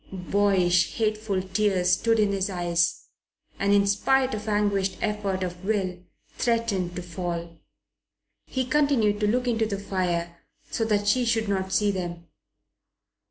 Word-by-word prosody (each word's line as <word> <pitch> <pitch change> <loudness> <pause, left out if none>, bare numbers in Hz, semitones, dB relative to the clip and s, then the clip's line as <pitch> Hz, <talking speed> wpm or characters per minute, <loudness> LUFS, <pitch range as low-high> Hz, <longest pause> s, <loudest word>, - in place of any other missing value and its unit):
Boyish, 185 -2 +2
hateful 215 -3 -1
tears 190 -2 +1
stood 225 +5 +2
in 210 -1 +3
his 195 0 -1
eyes 175 -2 0 0.6
and, 200 0 +1
in 200 0 +5
spite 260 +6 +2
of 215 +1 -4
anguished 205 -2 +1
effort 205 -3 -1
of 180 0 -5
will, 190 -3 -1 0.4
threatened 230 -7 0
to 180 - -5
fall. 170 -1 -5 0.9
He 260 -1 -2
continued 255 -7 +2
to 210 - +1
look 250 +4 +1
into 225 -2 +1
the 200 -2 -3
fire, 175 -3 -2 0.3
so 225 - 0
that 205 -2 0
she 250 +5 +3
should 225 -2 +1
not 190 -1 -1
see 205 +2 +2
them. 175 -3 -5
200 Hz, 145 wpm, -26 LUFS, 180-215 Hz, 0.9 s, in